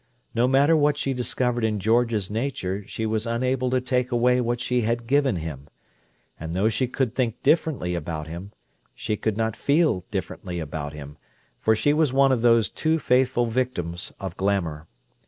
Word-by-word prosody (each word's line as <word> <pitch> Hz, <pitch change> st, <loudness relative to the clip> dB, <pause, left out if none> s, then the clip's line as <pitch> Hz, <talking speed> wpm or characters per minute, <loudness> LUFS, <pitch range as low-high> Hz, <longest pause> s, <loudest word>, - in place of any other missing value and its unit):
No 120 Hz, +2 st, +2 dB
matter 140 Hz, +5 st, +4 dB
what 145 Hz, -1 st, +3 dB
she 135 Hz, -2 st, -1 dB
discovered 125 Hz, -1 st, -1 dB
in 110 Hz, -2 st, 0 dB
George's 110 Hz, -1 st, +1 dB
nature 105 Hz, -5 st, -2 dB
she 110 Hz, -, -4 dB
was 110 Hz, +1 st, -1 dB
unable 125 Hz, +2 st, 0 dB
to 130 Hz, 0 st, +2 dB
take 125 Hz, 0 st, -1 dB
away 125 Hz, +1 st, +3 dB
what 120 Hz, 0 st, -1 dB
she 125 Hz, 0 st, 0 dB
had 115 Hz, +1 st, -1 dB
given 135 Hz, -2 st, +2 dB
him; 75 Hz, -4 st, -6 dB, 0.7 s
and 80 Hz, +1 st, -5 dB
though 100 Hz, +4 st, +2 dB
she 125 Hz, +3 st, 0 dB
could 125 Hz, -1 st, -1 dB
think 120 Hz, -4 st, -2 dB
differently 145 Hz, -, +1 dB
about 80 Hz, -2 st, -4 dB
him, 85 Hz, +6 st, -8 dB, 0.4 s
she 105 Hz, -, -2 dB
could 110 Hz, 0 st, -2 dB
not 110 Hz, -1 st, 0 dB
feel 145 Hz, -, +2 dB
differently 90 Hz, -1 st, -4 dB
about 75 Hz, -2 st, -5 dB
him, 75 Hz, 0 st, -10 dB, 0.4 s
for 110 Hz, -, +3 dB
she 145 Hz, +6 st, +2 dB
was 155 Hz, -3 st, +2 dB
one 135 Hz, 0 st, +4 dB
of 125 Hz, -3 st, +1 dB
those 115 Hz, -2 st, +4 dB
too 160 Hz, 0 st, +1 dB
faithful 125 Hz, -3 st, +2 dB
victims 110 Hz, -8 st, -2 dB
of 95 Hz, -3 st, -5 dB
glamour. 85 Hz, -6 st, -1 dB
115 Hz, 175 wpm, -24 LUFS, 95-130 Hz, 0.7 s, matter